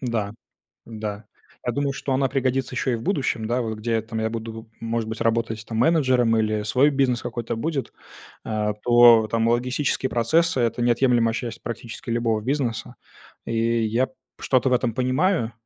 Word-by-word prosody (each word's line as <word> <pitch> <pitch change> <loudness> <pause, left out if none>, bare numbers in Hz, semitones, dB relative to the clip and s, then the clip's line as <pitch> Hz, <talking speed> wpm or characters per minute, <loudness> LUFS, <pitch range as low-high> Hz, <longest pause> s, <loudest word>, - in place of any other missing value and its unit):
Да, 115 -5 -2 0.5
да, 105 -2 -6 0.4
я 120 - +1
думаю, 140 +2 -1
что 135 0 -3
она 135 0 +2
пригодится 130 -1 -1
ещё 130 +1 0
и - - +1
в 115 - -6
будущем, 135 - -1
да, 120 +2 0
вот 110 -2 -4
где 115 +2 -3
я 110 - +1
там 110 0 -5
я 110 0 0
буду, 115 0 -7
может 115 -1 -2
быть, 110 0 -5
работать 115 -1 0
там 110 - -5
менеджером 125 -4 +3
или 110 -1 0
свой 130 +7 +3
бизнес 135 -4 +1
какой-то 115 -1 -4
будет, 135 +1 -3 0.5
э, 105 -1 -1
то 120 -2 +7
там 115 +1 0
логистические 125 +3 0
процессы- 130 +5 +2
это 120 +1 0
неотъемлемая 120 -1 +3
часть 120 0 -5
практически 115 0 -7
любого 115 -2 0
бизнеса, 120 -4 -2 0.5
и 115 0 0
я 115 +4 +1
п - - -26 0.3
что-то 130 0 +2
в - - +2
этом 120 -2 +1
понимаю. 130 - +1
115 Hz, 175 wpm, -23 LUFS, 115-130 Hz, 0.5 s, то